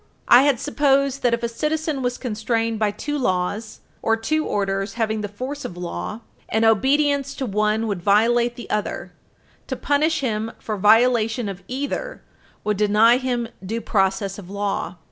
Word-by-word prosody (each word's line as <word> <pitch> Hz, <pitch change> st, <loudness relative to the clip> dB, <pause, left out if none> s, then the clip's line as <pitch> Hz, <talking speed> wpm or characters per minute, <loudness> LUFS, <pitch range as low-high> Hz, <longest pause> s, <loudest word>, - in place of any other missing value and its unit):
I 245 Hz, -, +8 dB
had 275 Hz, -3 st, +2 dB
supposed 275 Hz, -2 st, +1 dB
that, 240 Hz, -1 st, +3 dB
if 235 Hz, -, -11 dB
a -, -, +2 dB
citizen 300 Hz, +4 st, -2 dB
was 245 Hz, -1 st, -1 dB
constrained 225 Hz, -1 st, -1 dB
by 215 Hz, -1 st, +2 dB
two 290 Hz, +8 st, -4 dB
laws, 205 Hz, +1 st, -2 dB, 0.2 s
or 225 Hz, 0 st, +2 dB
two 310 Hz, +8 st, 0 dB
orders 195 Hz, 0 st, -1 dB
having 220 Hz, -2 st, -1 dB
the 205 Hz, -, -3 dB
force 255 Hz, +8 st, -6 dB
of 175 Hz, -, -7 dB
law, 180 Hz, +5 st, -5 dB, 0.3 s
and 220 Hz, +1 st, +2 dB
obedience 275 Hz, +5 st, +2 dB
to 265 Hz, -, -3 dB
one 215 Hz, +1 st, 0 dB
would 200 Hz, -5 st, -3 dB
violate 235 Hz, +5 st, +3 dB
the 240 Hz, -, -9 dB
other, 210 Hz, -1 st, -2 dB, 0.6 s
to -, -, -3 dB
punish 305 Hz, +2 st, +1 dB
him 225 Hz, -3 st, -2 dB
for 215 Hz, -, -4 dB
violation 225 Hz, +2 st, +3 dB
of 195 Hz, -2 st, -6 dB
either 285 Hz, -, -4 dB, 0.4 s
would 210 Hz, -1 st, 0 dB
deny 215 Hz, +3 st, +5 dB
him 245 Hz, -2 st, -2 dB, 0.2 s
due 220 Hz, +5 st, -3 dB
process 195 Hz, -2 st, 0 dB
of 185 Hz, -3 st, -11 dB
law. 200 Hz, -3 st, -3 dB
225 Hz, 165 wpm, -22 LUFS, 210-265 Hz, 0.6 s, I